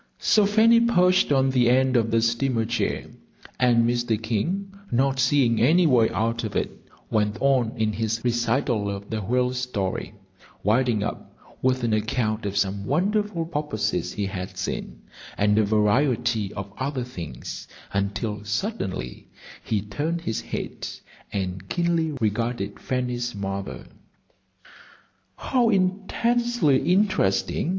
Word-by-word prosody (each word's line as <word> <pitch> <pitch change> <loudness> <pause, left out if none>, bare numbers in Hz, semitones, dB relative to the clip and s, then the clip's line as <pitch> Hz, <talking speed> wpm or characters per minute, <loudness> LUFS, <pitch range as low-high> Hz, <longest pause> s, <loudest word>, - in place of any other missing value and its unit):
So 210 -2 +3
Fanny 225 +3 +5
perched 185 -8 +3
on 135 -1 +3
the 125 -2 +3
end 130 +1 +3
of 115 -2 +3
the 115 0 +2
steamer 115 0 +1
chair, 115 +2 -1 0.5
and 120 -2 +4
Mr. 120 -2 0
King, 170 - -2 0.2
not 135 +2 +1
seeing 130 -3 +3
any 165 +9 +5
way 120 -7 +4
out 115 +2 -1
of 110 - -4
it, - - 0 0.4
went 105 -1 +1
on 130 -4 +2
in 110 -1 0
his 110 +1 -1
recital 120 -2 0
of 100 +1 -6
the 110 -1 -2
whale 125 +4 +1
story, 125 -7 -3 0.5
winding 115 0 +2
up - - -6 0.2
with 130 -1 +1
an 115 -2 +1
account 110 0 -1
of 100 0 -3
some 100 0 0
wonderful 190 - 0
porpoises 150 -9 -2
he 105 - -2
had 95 -1 -5
seen, - - -5 0.3
and 105 +1 +3
a - - +4
variety 110 0 +1
of 100 0 -6
other 135 -1 -2
things, 85 - -7 0.3
until 105 +1 -2
suddenly 105 - -3 0.4
he 105 -3 -1
turned 150 +12 -3
his 115 -9 -2
head - - -5 0.4
and 95 -1 -4
keenly 170 -2 +1
regarded 115 +2 -1
Fanny's 125 -2 -2
mother. 100 -1 -5 1.5
"How 245 -3 +1
intensely 200 - +1
interesting!" 180 - +1
120 Hz, 130 wpm, -24 LUFS, 105-145 Hz, 1.5 s, Fanny